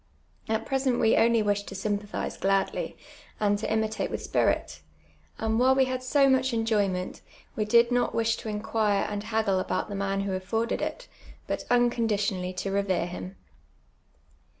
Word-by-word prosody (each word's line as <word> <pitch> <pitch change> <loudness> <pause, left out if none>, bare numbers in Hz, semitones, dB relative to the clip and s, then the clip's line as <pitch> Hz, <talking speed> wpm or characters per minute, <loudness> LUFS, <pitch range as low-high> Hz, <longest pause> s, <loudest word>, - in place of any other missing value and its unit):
At 220 0 0
j)resent 265 -2 0
we 225 -1 +4
only 230 -1 +4
wished 205 0 0
to 195 - -7
sympathize 205 +1 -3
t^ladly, 195 0 0 0.4
and 205 -1 +2
to 215 - -3
imitate 220 0 0
with - - -4
spirit, - - 0 0.6
and 220 0 0
while 260 +1 +5
we 265 0 +4
had 255 0 -3
so 275 +2 +3
much 260 -1 +2
enjoyment, 205 -5 0 0.3
we 215 - 0
did 235 +2 +4
not 245 0 +1
wish 230 0 +2
to 220 - -6
inquire 210 -1 0
and 205 0 -4
hap^fj^le 220 -4 +1
about 185 - -2
the 205 - -4
man 195 0 -1
who 195 -1 -2
afforded 225 +5 -1
it, - - -4 0.4
but - - -3
imconditionally 215 -6 +1
to 195 - -2
revere 195 -3 0
him. 180 +2 -7
215 Hz, 160 wpm, -27 LUFS, 200-235 Hz, 0.6 s, while